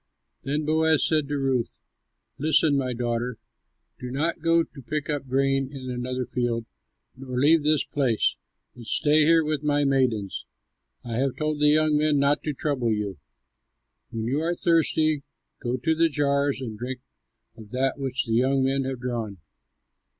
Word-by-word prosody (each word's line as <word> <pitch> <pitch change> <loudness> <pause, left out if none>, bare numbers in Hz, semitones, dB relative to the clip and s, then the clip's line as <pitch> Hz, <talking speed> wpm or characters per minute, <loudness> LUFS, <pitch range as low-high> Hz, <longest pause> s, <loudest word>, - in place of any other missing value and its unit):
Then 150 +2 -2
Boaz 160 0 +3
said 155 -3 +1
to 145 0 -2
Ruth, 135 -4 -1 0.6
"Listen, 155 0 +3
my 130 -2 0
daughter. 120 0 -2 0.6
Do 125 - -6
not 155 +6 -1
go 165 0 +3
to 140 - -13
pick 150 +4 -3
up 145 -2 -3
grain 135 +1 +1
in 130 -3 -6
another 125 +1 -3
field 120 -2 -2 0.5
nor 130 -1 -6
leave 150 +5 +5
this 150 0 +2
place, 130 -7 +1 0.4
but 120 -2 -11
stay 150 +5 +3
here 165 0 +5
with 150 -2 -1
my 145 -1 +1
maidens. 125 -8 0 0.6
I 115 -2 -4
have 135 0 0
told 155 -1 -2
the 150 - +4
young 155 0 +3
men 150 -1 +2
not 140 +1 +2
to 150 - -1
trouble 130 -5 -1
you. 105 -5 -2 0.9
When 110 -1 -4
you 135 +6 0
are 170 +2 0
thirsty, 155 -3 +2 0.4
go 125 0 -2
to 145 +6 +1
the 165 +1 +3
jars 140 -2 +1
and 110 -4 -6
drink 125 +1 -5 0.5
of 110 -2 -13
that 130 +4 -1
which 135 -1 -2
the 115 - -2
young 130 +3 +2
men 135 0 +1
have 130 -2 -4
drawn." 115 -5 -3
135 Hz, 165 wpm, -25 LUFS, 125-150 Hz, 0.9 s, leave